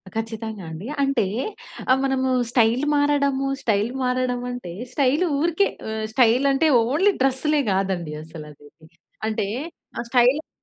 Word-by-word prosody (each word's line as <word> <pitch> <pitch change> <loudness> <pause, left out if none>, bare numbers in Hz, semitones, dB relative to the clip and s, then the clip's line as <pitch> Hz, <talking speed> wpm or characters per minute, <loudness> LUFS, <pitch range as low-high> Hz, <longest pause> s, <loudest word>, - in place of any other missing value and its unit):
ఖచ్చితంగా 225 -2 -4
అండి. 165 +7 -7 0.2
అంటే 275 -6 +1 0.7
ఆహ్, 260 - +4
మనము 265 -1 0 0.2
స్టైల్ 240 +2 +3
మారడము, 280 -2 +2
స్టైల్ 215 +1 +1
మారడం 250 -1 0
అంటే, 245 -9 -7 0.2
స్టైల్ 280 +5 +2 0.2
ఊరికే 345 +5 +2 0.2
ఆహ్, 220 0 -3
స్టైల్ 245 +2 +4
అంటే 275 +4 +3 0.2
ఓన్లీ 315 - +3
డ్రెస్‌లే 280 +3 +2
కాదండి 190 -5 -1
అసలదేది. 155 0 -13 0.4
అంటే, 215 -2 -1 0.6
స్టైల్ 250 +4 +4
ఆ! - - -61
245 Hz, 125 wpm, -23 LUFS, 215-275 Hz, 0.7 s, ఆహ్